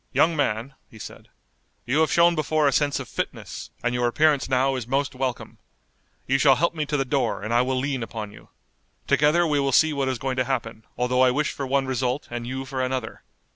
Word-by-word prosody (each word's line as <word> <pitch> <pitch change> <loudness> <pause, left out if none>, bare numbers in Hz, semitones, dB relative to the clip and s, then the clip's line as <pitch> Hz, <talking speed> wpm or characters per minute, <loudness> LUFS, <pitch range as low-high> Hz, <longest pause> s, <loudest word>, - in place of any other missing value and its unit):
"Young 165 0 +3
man," 130 -2 -1 0.2
he 110 - -15
said, 110 - -10 0.6
"you 130 +6 +1
have 160 - +2
shown 170 0 +5
before 155 -1 +1
a - - +3
sense 145 +1 +1
of - - -7
fitness, - - -6
and 120 0 0
your 125 0 +1
appearance 145 +2 +2
now 135 +1 +2
is 125 -3 -5
most 140 +2 -1
welcome. 130 -2 -4 0.7
You 135 +1 +1
shall 135 -1 +6
help 170 +6 +1
me 155 -3 -3
to 150 - 0
the 135 - 0
door, 135 -5 -1
and 110 +2 -2
I 120 - +4
will 130 +1 -1
lean 135 0 -2
upon 105 -1 -6
you. - - -16 0.6
Together 150 +4 +3
we 150 -3 +1
will 140 -1 +1
see 155 +4 +4
what 135 -2 -1
is 130 - -2
going 130 +2 -3
to 130 - +2
happen, 115 -4 -4
although 125 +1 +1
I 130 - +6
wish 145 +4 0
for 140 - -5
one 135 +1 +1
result, 130 +1 -2
and 120 0 -5
you 130 +1 -4
for 130 -1 -4
another. 130 -3 -3
135 Hz, 225 wpm, -24 LUFS, 125-145 Hz, 0.7 s, shall